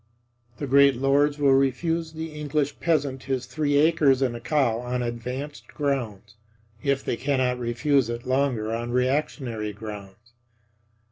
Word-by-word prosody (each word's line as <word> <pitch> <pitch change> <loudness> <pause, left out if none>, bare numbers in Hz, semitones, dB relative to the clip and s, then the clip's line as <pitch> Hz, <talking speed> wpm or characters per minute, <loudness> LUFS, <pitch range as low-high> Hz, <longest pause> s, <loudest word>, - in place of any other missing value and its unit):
The 145 - -4
great 140 0 +5
lords 140 +3 +2
will 140 -2 +4
refuse 160 +5 +1
the 160 0 -6
English 150 -1 -2
peasant 140 -5 0
his 130 -2 -2
three 145 +1 0
acres 145 -4 +4
and 125 -3 0
a - - -6
cow 120 -4 +1
on 125 0 -2
advanced 125 +5 -5
grounds, 115 -8 -3 0.5
if 140 -1 0
they - - 0
cannot 130 -1 0
refuse 125 +2 +1
it 120 0 -5
longer 130 -4 0
on 120 +1 -3
reactionary 125 -4 -1
grounds. 105 +1 -10
135 Hz, 140 wpm, -25 LUFS, 120-145 Hz, 0.5 s, great